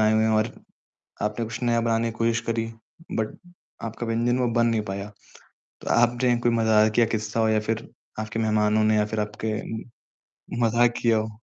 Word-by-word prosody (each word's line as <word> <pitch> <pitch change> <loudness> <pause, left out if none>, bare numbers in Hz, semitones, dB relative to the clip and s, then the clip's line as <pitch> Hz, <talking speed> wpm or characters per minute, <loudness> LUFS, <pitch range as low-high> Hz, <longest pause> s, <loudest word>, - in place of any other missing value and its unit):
आए 110 0 +4
हुए 110 0 +3
हों 110 - +3
और 110 +1 +1 0.7
आपने 105 +2 -1
कुछ 115 +2 -7
नया 120 -1 +2
बनाने 115 0 +1
की 115 - -13
कोशिश 115 0 +2
करी 115 -1 0 0.5
बट 110 - -2 0.5
आपका 115 +2 -6
व्यंजन 120 +2 +1
वो 125 - +2
बन 120 0 +3
नहीं 115 -2 +2
पाया, 100 +1 -4 0.7
तो - - -6
आपने 120 +1 +3
कोई 120 - +5
मज़ाकिया 110 0 +4
किस्सा 110 +1 -3
हो 110 - +3
या 110 0 +3
फिर 110 +1 -3 0.3
आपके 110 +1 -3
मेहमानों 110 -1 +2
ने 110 0 +3
या 105 0 +3
फिर 110 0 -3
आपके 105 +1 -3 1.1
मज़ाक 120 +1 +3
किया 115 -2 +4
हो? 110 +1 -2
115 Hz, 185 wpm, -25 LUFS, 110-115 Hz, 1.1 s, कोई